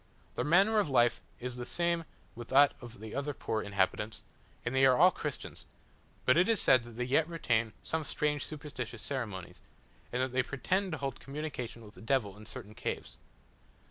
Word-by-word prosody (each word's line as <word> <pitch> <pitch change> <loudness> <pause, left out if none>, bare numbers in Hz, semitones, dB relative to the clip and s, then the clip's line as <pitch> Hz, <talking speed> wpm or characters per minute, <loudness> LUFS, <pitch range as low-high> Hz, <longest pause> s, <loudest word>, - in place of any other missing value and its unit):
Their - - 0
manner 195 +8 +5
of 200 - +1
life 120 -3 +3 0.2
is 125 0 -5
the 125 - -4
same 170 +4 0 0.3
with 120 -1 -8
that 140 +1 +6
of 120 -4 -10
the 110 0 -8
other 140 +1 -2
poor 110 - -2
inhabitants, 100 +2 -1 0.4
and 120 - -1
they 135 0 +3
are 130 -2 +6
all 180 +4 +7
Christians; 150 -4 -6 0.6
but 130 - +5
it 180 +5 +4
is 225 -3 +3
said 130 - +6
that 115 -1 -11
they 125 - 0
yet 140 +6 +2
retain 115 -9 0
some 160 0 -1
strange 150 -1 0
superstitious 135 -7 -5
ceremonies, 110 -10 -4 0.5
and 125 - -1
that 130 0 0
they 130 +1 +2
pretend 180 +8 -1
to - - -2
hold 135 -2 -4
communication 135 -5 -5
with 105 - -13
the - - -14
devil 115 -5 0
in 105 +1 -12
certain 105 - -7
caves. - - -5
130 Hz, 190 wpm, -32 LUFS, 115-150 Hz, 0.6 s, all